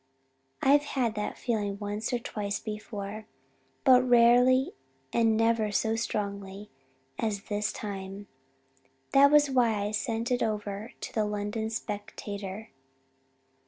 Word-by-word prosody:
I've 285 +2 +6 0.2
had 235 -4 +2
that 210 -1 -4
feeling 205 -5 -2
once 205 +1 -3
or 245 - +1
twice 205 -3 -4
before, 210 -1 -6 0.6
but 255 -1 +7
very 255 - -1
rarely 245 +5 +5 0.4
and 225 -2 +3
never 225 -1 +2
so 220 +2 +1
strongly 200 -2 -4 0.5
as 205 -3 -1
this 210 0 -1
time. 195 -1 -6 0.9
That 280 +1 +7
was 295 -1 +5
why 240 -4 +3
I 205 - -2
sent 225 +3 -2
it 250 - +1
over 210 0 -3
to - - -6
the 215 -2 +1
London 210 +1 -2
Spectator. 205 -1 -6
215 Hz, 125 wpm, -29 LUFS, 205-235 Hz, 0.9 s, but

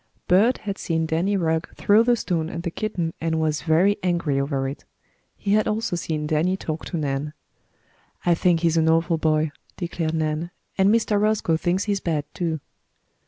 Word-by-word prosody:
Bert 215 +8 +4
had 200 -1 -5
seen 160 -1 0
Danny 175 +6 +1
Rugg 160 -2 -1
throw 205 +2 +4
the 240 +1 +3
stone 165 -7 -2
at 170 0 -5
the 170 - -2
kitten 175 -5 -2
and 160 0 0
was 155 -1 0
very 175 +6 +3
angry 170 -6 0
over 140 -1 -1
it. 135 - -7 0.5
He 200 - 0
had 215 0 +3
also 215 -3 -1
seen 155 -3 -2
Danny 160 +5 +1
talk 155 -4 -5
to 175 - -4
Nan. 145 0 -2 0.9
"I 175 - +5
think 170 0 +2
he's 165 -1 +2
an 160 0 +3
awful 165 0 +2
boy," 155 -1 +1 0.3
declared 170 -2 -2
Nan. 155 +1 -1 0.3
"And 190 0 +4
Mr. 215 -2 +2
Roscoe 210 -6 +2
thinks 175 +4 0
he 210 - -1
is 200 - 0
bad, 155 -5 -1
too." 165 -3 -2
165 Hz, 185 wpm, -23 LUFS, 160-190 Hz, 0.9 s, I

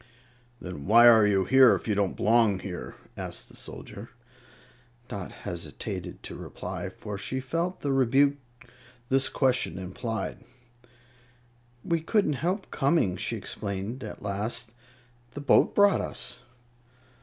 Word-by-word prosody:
"Then 90 -5 -7
why 115 +3 +8
are 110 -3 +7
you 95 -2 +2
here, 130 +1 +7
if - - -6
you 105 - +2
don't 100 -2 0
belong 110 -2 +4
here?" 90 -2 -7 0.2
asked - - -6
the - - -15
soldier. 105 +4 -8 1.0
Dot 100 -3 -6
hesitated 85 -4 -6
to - - -7
reply, - - -6
for 105 -2 -7
she 130 +5 -3
felt 165 +8 -2
the 140 -1 0
rebuke 135 +2 +3 0.7
this 135 0 +2
question 130 - +1
implied. 95 +3 -4 1.4
"We 165 -1 +1
couldn't 195 -2 +2
help 185 +5 -2
coming," 135 - +2
she - - -2
explained, 100 +5 -5
at 105 - -8
last; 105 +3 -3 0.6
"the 145 - -5
boat 140 - +4
brought 200 -1 +5
us." 120 0 -6
115 Hz, 130 wpm, -27 LUFS, 100-135 Hz, 1.4 s, why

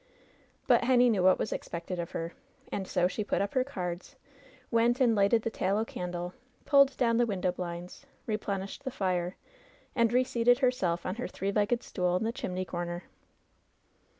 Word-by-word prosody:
But - - +4
Henny 250 -1 +5
knew 200 -4 +1
what 185 0 +5
was - - -2
expected 175 +1 -5
of 170 - -3
her, 165 +1 -4 0.4
and 190 -2 -3
so 180 -1 +2
she 200 +4 -3
put - - -1
up 200 0 -1
her 255 - +3
cards, 185 -2 -5 0.6
went 235 +1 +3
and 245 -3 +4
lighted 210 +2 +3
the 230 - -2
tallow 200 +3 0
candle, 175 -2 -5 0.3
pulled 275 -2 +5
down 230 -3 +2
the 240 0 +3
window 185 -4 0
blinds, 175 0 -7 0.2
replenished 200 -3 -3
the 265 - -2
fire, 185 -6 -1 0.6
and 230 -2 +3
reseated 245 -1 +3
herself 245 -10 +1
on 185 +4 -3
her 250 - -3
three 195 +1 -3
legged 215 +4 +1
stool 180 -2 0
in 185 - 0
the 225 - 0
chimney 185 -4 -3
comer. 175 0 -4
200 Hz, 175 wpm, -30 LUFS, 180-240 Hz, 0.6 s, Henny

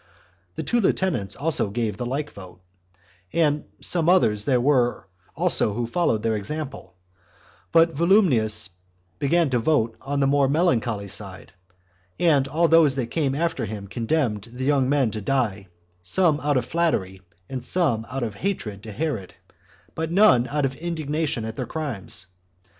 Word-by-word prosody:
The - - -4
two 240 -1 +1
lieutenants 180 - 0
also 150 -7 +1
gave 110 -1 -2
the 120 +3 -4
like 145 +4 -3
vote; 95 -2 -12 1.2
some 170 -2 +2
others 105 - +3
there 130 -3 +2
were 125 -4 +1 0.3
also 105 - +2
who 120 +1 -1
followed 115 -4 0
their 115 -1 +1
example; 135 +3 -5 0.8
but 165 0 +4
Volumnius 130 - +3 0.5
began 160 +1 +2
to 125 - +2
vote 115 -3 +1
on 140 +1 -3
the 140 - +3
more 140 0 +3
melancholy 120 - 0
side, 100 -1 -5 0.7
and 145 -6 +3
all 165 +5 +2
those 160 -4 +5
that 120 -4 -3
came 140 -5 0
after 165 -3 -1
him 105 -1 -6
condemned 115 -1 -1
the 130 +2 -5
young 135 -2 +2
men 135 -5 +2
to 110 - -5
die, 105 -5 -1 0.3
some 150 - +3
out 145 -2 +1
of 125 - -1
flattery, 125 - -1 0.3
and 130 -2 -6
some 130 -11 0
out 130 0 -3
of 110 -3 -3
hatred 105 - -4
to 110 0 -9
Herod; 115 - -4 0.6
but 160 0 -3
none 170 - +5
out 145 0 0
of 135 - -2
indignation 155 -6 -2
at 110 0 -6
their - - -3
crimes. 120 - -2
135 Hz, 155 wpm, -23 LUFS, 110-160 Hz, 1.2 s, those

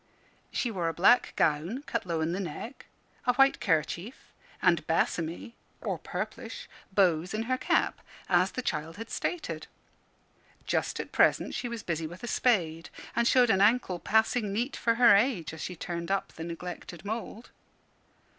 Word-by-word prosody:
She 240 - -1
wore 180 -5 -1
a 165 - -5
black 205 +8 +5
gown, 165 - +1
cut 275 -9 -3
low 165 -2 -1
in 160 +1 0
the 185 - -2
neck, 200 - -6 0.4
a 250 - +4
white 270 +1 +5
kerchief, 170 - -1 0.3
and 170 -3 +3
bassomy 165 +5 -1 0.3
(or - - -3
purplish) - - -6 0.2
bows 185 -1 +2
in 220 - -1
her 255 +3 0
cap - - +1 0.3
as 185 +1 +3
the 255 - -3
child 155 -2 -3
had 225 +1 -8
stated. 355 - -3 1.0
Just - - -1
at - - -5
present - - +3
she 245 - -3
was 235 -2 -5
busy 165 -2 -2
with 175 +6 -11
a - - -4
spade, 170 -11 +1 0.3
and 235 0 +3
showed 245 -2 +5
an 190 -1 +3
ankle 205 -4 +3
passing 220 0 +2
neat 240 +7 -1
for 230 -1 +1
her 235 -3 +7
age, 200 - +1
as 160 - -8
she 180 - -4
turned 170 0 -5
up 195 0 -1
the 165 - -7
neglected 170 +1 -7
mould. 225 +2 -5
195 Hz, 165 wpm, -29 LUFS, 170-235 Hz, 1.0 s, her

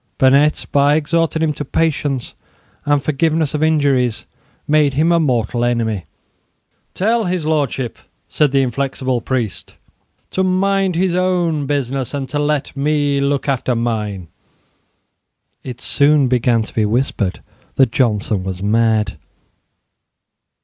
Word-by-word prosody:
Burnet, 140 +3 +3
by 145 +1 +4
exhorting 160 +1 0
him 155 -1 +1
to 145 - -5
patience 145 -3 -1 0.5
and 145 -1 +2
forgiveness 155 0 0
of 150 - -2
injuries, 140 -7 +1 0.4
made 150 -2 +3
him 160 +4 +2
a 170 - +4
mortal 120 -5 0
enemy. 115 -6 -1 0.9
"Tell 225 +3 +1
His 180 -3 -2
Lordship," 140 -5 -1 0.3
said 150 -3 +1
the 135 0 +3
inflexible 130 0 -2
priest, 115 -8 -3 0.6
"to 190 - -1
mind 190 0 +1
his 180 +1 +1
own 175 -5 0
business, 135 -1 -2
and 135 -2 -3
to 145 - -2
let 145 -2 -1
me 145 0 +1
look 140 0 0
after 130 -2 0
mine." 105 -6 -3 1.4
It 125 -2 -7
soon 145 -1 +3
began 120 -2 +2
to - - -12
be 110 - +1
whispered 105 -3 -1 0.3
that 130 -4 +3
Johnson 105 -5 0
was 95 0 -5
mad. 110 -4 +1
140 Hz, 130 wpm, -18 LUFS, 120-155 Hz, 1.4 s, by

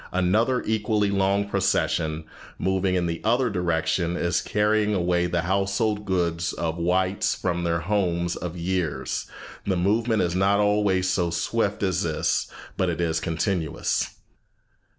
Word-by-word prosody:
Another 110 +8 +2
equally 105 -1 +1
long 100 +1 +1
procession, 85 -5 0 0.3
moving 95 0 0
in 90 -1 +1
the 85 -1 -3
other 120 +2 +2
direction, 85 -1 0
is 85 0 +1
carrying 105 0 +1
away 90 -1 +1
the 90 -1 0
household 100 +3 0
goods 85 -3 0
of 80 0 -2
the - - -4
whites 95 +3 +1
from 85 -1 -2
their 85 0 0
homes 85 -3 0
of 90 -1 -5
years." 85 -7 -2 0.4
The 95 -2 +1
movement 110 +3 +2
is 85 -1 0
not 100 +2 +3
always 105 -3 +2
so 90 -2 +1
swift - - -1
as - - +1
this, - - 0 0.3
but 95 - +1
it 85 - -3
is 80 -1 +1
continuous. 80 0 -1
95 Hz, 145 wpm, -25 LUFS, 85-100 Hz, 0.4 s, not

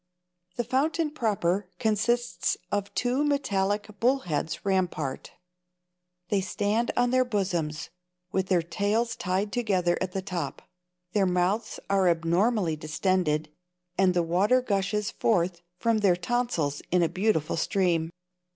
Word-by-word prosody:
The 240 - -1
fountain 295 +6 0
proper 200 - 0
consists 235 +2 0
of 205 0 -1
two 250 +3 +1
metallic 205 -9 0
bullheads 210 - 0
rampart. 180 -8 -1 1.0
They 200 -2 +2
stand 205 +4 0
on 245 0 +3
their 255 0 +4
bosoms, 180 -10 -2 0.4
with 190 -1 0
their 180 -3 +2
tails 210 +7 0
tied 190 +3 -1
together 190 -8 +1
at 185 -1 -2
the 190 - -2
top. 170 -7 -4 0.5
Their 200 -3 +3
mouths 180 +5 0
are 195 -2 +3
abnormally 170 +2 +2
distended, 155 0 0 0.5
and 185 -1 +3
the 175 - +3
water 190 +9 +3
gushes 210 -2 -1
forth 175 -5 +1 0.2
from 230 +2 +1
their 195 -4 +4
tonsils 175 - -1
in 180 -1 +3
a - - +3
beautiful 185 -5 0
stream. 170 -2 +1
195 Hz, 125 wpm, -27 LUFS, 175-225 Hz, 1.0 s, their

